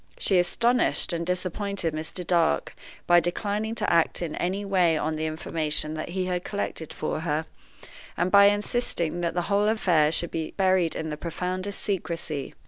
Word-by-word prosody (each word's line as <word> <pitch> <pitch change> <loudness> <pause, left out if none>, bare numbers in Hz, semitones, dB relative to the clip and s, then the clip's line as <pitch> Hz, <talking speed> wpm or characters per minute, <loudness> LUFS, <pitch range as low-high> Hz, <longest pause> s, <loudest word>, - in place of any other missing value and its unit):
She 190 -3 +3
astonished 235 +3 +2
and 170 0 -2
disappointed 185 -1 -2
Mr. 160 +3 -4
Dark 165 - +1 0.3
by 175 0 +6
declining 205 +6 -2
to 215 -5 0
act 170 +1 +2
in 160 - -4
any 195 +3 -2
way 180 -5 +3
on 155 +1 -1
the 155 +1 -2
information 155 -1 -1
that 155 +1 -5
he 185 +1 -2
had 180 -1 -2
collected 200 -6 -4
for - - -3
her, 155 -1 -1 0.7
and 180 +2 0
by 200 0 +8
insisting 205 -5 0
that 170 -1 -1
the 175 - 0
whole 205 +2 +1
affair 175 -9 +3
should 170 +1 +2
still 165 - -2
be 155 - -6
buried 185 -3 +2
in 160 -1 -4
the 150 - -4
profoundest 185 +4 -4
secrecy. 165 -7 -3
175 Hz, 175 wpm, -26 LUFS, 160-195 Hz, 0.7 s, by